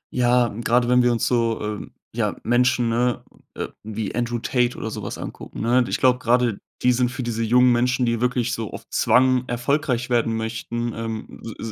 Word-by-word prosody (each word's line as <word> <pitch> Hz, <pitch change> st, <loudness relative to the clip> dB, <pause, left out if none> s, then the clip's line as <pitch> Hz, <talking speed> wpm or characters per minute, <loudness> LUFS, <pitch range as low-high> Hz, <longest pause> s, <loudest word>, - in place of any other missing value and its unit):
Ja, 125 Hz, -1 st, +3 dB
gerade 120 Hz, +3 st, +1 dB
wenn 125 Hz, 0 st, +5 dB
wir 120 Hz, 0 st, +3 dB
uns 115 Hz, -, 0 dB
so, 115 Hz, -2 st, +1 dB
ähm, 105 Hz, -1 st, -5 dB, 0.2 s
ja, -, -, 0 dB
Menschen, 120 Hz, 0 st, +2 dB
ne, 120 Hz, +1 st, 0 dB, 0.3 s
äh, -, -, -4 dB
wie 110 Hz, -1 st, -5 dB
Andrew 120 Hz, +1 st, -1 dB
Tate 125 Hz, +1 st, 0 dB
oder 110 Hz, -, -4 dB
so -, -, -5 dB
was -, -, -5 dB
angucken, -, -, -8 dB
ne? 120 Hz, +3 st, +3 dB
Ich -, -, -1 dB
glaube, 125 Hz, -1 st, +3 dB
gerade 120 Hz, -3 st, +1 dB, 0.2 s
die 125 Hz, -, +5 dB
sind 125 Hz, 0 st, +1 dB
für 130 Hz, +1 st, -5 dB
diese 115 Hz, -1 st, -2 dB
jungen 125 Hz, +2 st, +4 dB
Menschen, 125 Hz, +1 st, +2 dB
die 115 Hz, -1 st, 0 dB
wirklich 125 Hz, -1 st, 0 dB
so 115 Hz, -2 st, -4 dB
auf -, -, -7 dB
Zwang 130 Hz, 0 st, +3 dB
erfolgreich 125 Hz, 0 st, -1 dB
werden 115 Hz, -2 st, +1 dB
möchten, 115 Hz, +1 st, -3 dB
ähm, 115 Hz, -1 st, -6 dB, 0.2 s
s 115 Hz, -, -5 dB
120 Hz, 195 wpm, -23 LUFS, 115-125 Hz, 0.3 s, wenn